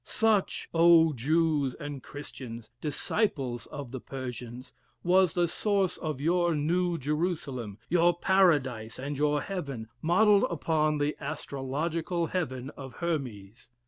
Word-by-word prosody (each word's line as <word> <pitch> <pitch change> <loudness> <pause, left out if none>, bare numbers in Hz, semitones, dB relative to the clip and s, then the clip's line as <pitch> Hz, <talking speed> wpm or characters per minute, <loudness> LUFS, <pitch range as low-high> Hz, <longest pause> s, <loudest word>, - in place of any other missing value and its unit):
Such, 220 -3 +1
O 165 -1 +6
Jews 145 0 +1
and 145 -2 -6
Christians! 125 -5 -9
disciples 145 - -1
of 140 -5 -7
the 130 - -5
Persians, 125 -1 -7 0.3
was 180 0 +4
the 175 -1 +3
source 200 +1 0
of 155 -5 -4
your 170 +2 +2
New 170 +4 +1
Jerusalem, 145 - -2
your 175 0 +3
paradise 145 - +2
and 140 +3 -4
your 150 +1 +1
heaven, 140 - -5
modelled 200 +5 +5
upon 155 -2 +1
the 145 +1 0
astrological 155 +4 -2
heaven 140 -7 -3
of 135 -4 -10
Hermes. 120 - -4
150 Hz, 120 wpm, -29 LUFS, 130-170 Hz, 0.3 s, O